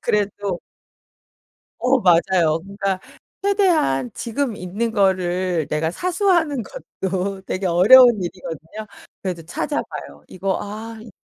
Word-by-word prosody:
그래도 205 Hz, -3 st, -1 dB, 1.2 s
어 255 Hz, +1 st, +3 dB
맞아요. 170 Hz, -3 st, +3 dB
그러니까 195 Hz, -1 st, -2 dB, 0.4 s
최대한 345 Hz, -, +2 dB
지금 235 Hz, -1 st, -2 dB
있는 200 Hz, +6 st, -3 dB
거를 185 Hz, -5 st, +1 dB
내가 155 Hz, +1 st, 0 dB
사수하는 350 Hz, -, +1 dB
것도 190 Hz, -, -4 dB
되게 185 Hz, +1 st, -2 dB
어려운 215 Hz, +6 st, +7 dB
일이거든요. 180 Hz, +3 st, -7 dB, 0.4 s
그래도 180 Hz, -3 st, -4 dB
찾아봐요. 75 Hz, -, -5 dB
이거 190 Hz, +1 st, -2 dB
'아 220 Hz, +2 st, -7 dB
이 220 Hz, 0 st, -12 dB
195 Hz, 260 characters per minute, -21 LUFS, 175-230 Hz, 1.2 s, 어려운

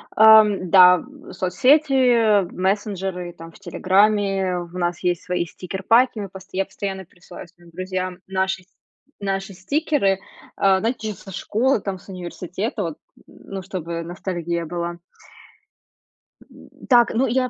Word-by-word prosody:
Ам, 215 Hz, -4 st, +6 dB
да, 180 Hz, -1 st, +8 dB
м 280 Hz, +6 st, -12 dB
соцсети, 245 Hz, -, +3 dB
мессенджеры 190 Hz, -2 st, -2 dB
там 165 Hz, 0 st, -12 dB
в -, -, -18 dB
"Телеграме", 195 Hz, 0 st, +1 dB
у 175 Hz, 0 st, -7 dB
нас 175 Hz, -1 st, -1 dB
есть 175 Hz, -1 st, 0 dB
свои 180 Hz, -3 st, -1 dB
стикерпаки. 205 Hz, +8 st, +1 dB
Мы 200 Hz, -1 st, -5 dB
постоя 190 Hz, 0 st, -8 dB
я -, -, -1 dB
постоянно 190 Hz, -1 st, -6 dB
пересылаю 175 Hz, +1 st, -13 dB
своим 175 Hz, 0 st, -21 dB
друзьям 185 Hz, +1 st, -4 dB
наши 190 Hz, 0 st, -1 dB
сь -, -, -32 dB, 0.5 s
наши 195 Hz, 0 st, -3 dB
стикеры, 200 Hz, -, 0 dB, 0.4 s
а, 195 Hz, -1 st, +3 dB
знаете, 225 Hz, 0 st, -2 dB
ещё 205 Hz, -, -6 dB
со 195 Hz, -, -11 dB
школы, 225 Hz, +6 st, 0 dB
там 190 Hz, -2 st, -4 dB
с -, -, -20 dB
университета, 185 Hz, -, -5 dB
вот, 165 Hz, -3 st, -5 dB, 0.3 s
ну, 195 Hz, -1 st, -9 dB
чтобы 170 Hz, -3 st, -5 dB
ностальгия 170 Hz, -1 st, -4 dB
была. 170 Hz, +1 st, -4 dB, 1.5 s
М, -, -, -16 dB, 0.2 s
так, 240 Hz, -2 st, +5 dB
ну 260 Hz, +4 st, +2 dB
я 255 Hz, +1 st, 0 dB
190 Hz, 140 wpm, -22 LUFS, 180-215 Hz, 1.5 s, да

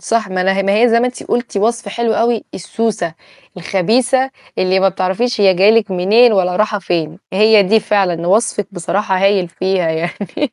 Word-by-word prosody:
صح 225 Hz, -3 st, -1 dB
ما 185 Hz, -1 st, -2 dB
لا 195 Hz, 0 st, +1 dB
ما 195 Hz, -, 0 dB
هي 245 Hz, -, +5 dB
زي 230 Hz, +1 st, +2 dB
ما 250 Hz, -, +1 dB
أنتِ 250 Hz, -, -6 dB
قُلتِ 235 Hz, -3 st, -3 dB
وصف 230 Hz, +1 st, -1 dB
حلو 230 Hz, +1 st, -1 dB
أوي، 235 Hz, -1 st, 0 dB
السوسة، 190 Hz, -4 st, -3 dB, 0.4 s
الخبيثة، 245 Hz, +9 st, 0 dB, 0.3 s
اللي 185 Hz, +1 st, +1 dB
ما 195 Hz, -, +4 dB
بتعرفيش 190 Hz, +6 st, -2 dB
هي 190 Hz, -2 st, +4 dB
جاية 195 Hz, +4 st, +4 dB
لِك 225 Hz, -3 st, +2 dB
منين 215 Hz, +6 st, +3 dB
ولا 180 Hz, -2 st, 0 dB
رايحة 210 Hz, -1 st, 0 dB
فين، 170 Hz, -2 st, -3 dB
هي 215 Hz, +1 st, +4 dB
دي 215 Hz, +4 st, +2 dB
فعلًا 180 Hz, -5 st, -1 dB
وصفِك 205 Hz, 0 st, +1 dB
بصراحة 190 Hz, +2 st, -2 dB
هايل 195 Hz, -3 st, +2 dB
فيها 185 Hz, -1 st, -1 dB
يعني. 180 Hz, -, -4 dB
200 Hz, 185 wpm, -15 LUFS, 185-230 Hz, 0.4 s, هي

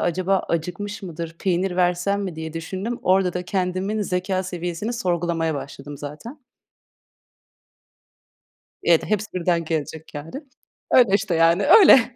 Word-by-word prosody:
acaba 185 Hz, +2 st, +1 dB
acıkmış 180 Hz, +5 st, -3 dB
mıdır, 165 Hz, -2 st, -6 dB
peynir 185 Hz, 0 st, 0 dB
versem 180 Hz, +3 st, +1 dB
mi 180 Hz, -5 st, -5 dB
diye 160 Hz, 0 st, -6 dB
düşündüm. 190 Hz, +8 st, -4 dB
Orada 185 Hz, -1 st, +3 dB
da 180 Hz, 0 st, -4 dB
kendimin 190 Hz, +3 st, -1 dB
zekâ 185 Hz, 0 st, -1 dB
seviyesini 180 Hz, +4 st, -4 dB
sorgulamaya 170 Hz, -7 st, -1 dB
başladım 140 Hz, +1 st, -7 dB
zaten. 225 Hz, -, -9 dB, 2.4 s
Evet. 170 Hz, -2 st, +4 dB
Hepsi 215 Hz, 0 st, -1 dB
birden 170 Hz, -2 st, 0 dB
gelecek 160 Hz, 0 st, -4 dB
yani. 160 Hz, -, -7 dB, 0.5 s
Öyle 230 Hz, -6 st, +6 dB
işte 195 Hz, -3 st, 0 dB
yani, 165 Hz, +4 st, +4 dB
öyle. 265 Hz, -, +7 dB
180 Hz, 125 wpm, -23 LUFS, 165-200 Hz, 2.4 s, öyle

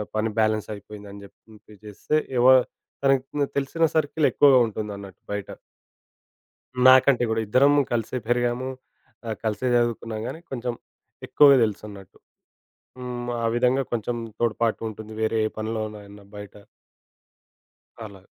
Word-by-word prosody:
పని 110 Hz, +1 st, 0 dB
బ్యాలెన్స్ 110 Hz, -1 st, 0 dB
అయిపోయిందని 100 Hz, 0 st, -11 dB
జెప్పి 100 Hz, -, -20 dB, 0.2 s
మెసేజ్ 105 Hz, -1 st, -19 dB
జేస్తే, 105 Hz, +9 st, -2 dB, 0.2 s
ఎవ 125 Hz, -, +5 dB, 0.6 s
తనకు 135 Hz, -1 st, +3 dB, 0.2 s
తె -, -, +3 dB
తెలిసిన 140 Hz, +4 st, +1 dB
సర్కిల్ 155 Hz, 0 st, +1 dB
ఎక్కువగా 140 Hz, -3 st, +5 dB
ఉంటుందన్నట్టు 100 Hz, -3 st, -7 dB
బయట. 100 Hz, -1 st, -4 dB, 1.4 s
నాకంటే 130 Hz, -1 st, +6 dB
గూడా. 110 Hz, 0 st, 0 dB
ఇద్దరము 140 Hz, +6 st, +4 dB
కలిసే 115 Hz, +2 st, -2 dB
పెరిగాము, 120 Hz, +1 st, 0 dB, 0.6 s
ఆహ్, 110 Hz, -2 st, -4 dB
కలిసే 110 Hz, +3 st, -2 dB
జదువుకున్నాం 115 Hz, -2 st, -1 dB
గానీ, 160 Hz, -, -6 dB
కొంచెం 125 Hz, -2 st, -3 dB, 0.5 s
ఎక్కువగా 140 Hz, -2 st, +6 dB
తెలుసన్నట్టు. 105 Hz, -3 st, -6 dB, 0.8 s
హ్మ్. 125 Hz, -1 st, -5 dB
ఆ -, -, +1 dB
విధంగా 125 Hz, +2 st, +2 dB
కొంచం 120 Hz, +1 st, -2 dB, 0.2 s
తోడ్పాటుంటుంది 110 Hz, -1 st, -2 dB
వేరే 110 Hz, +1 st, 0 dB
ఏ -, -, -7 dB
పనిలోనైనా 105 Hz, -2 st, -6 dB
బయట. 105 Hz, -1 st, -10 dB, 1.5 s
అలా. 100 Hz, -3 st, -12 dB
115 Hz, 120 wpm, -24 LUFS, 105-125 Hz, 1.5 s, నాకంటే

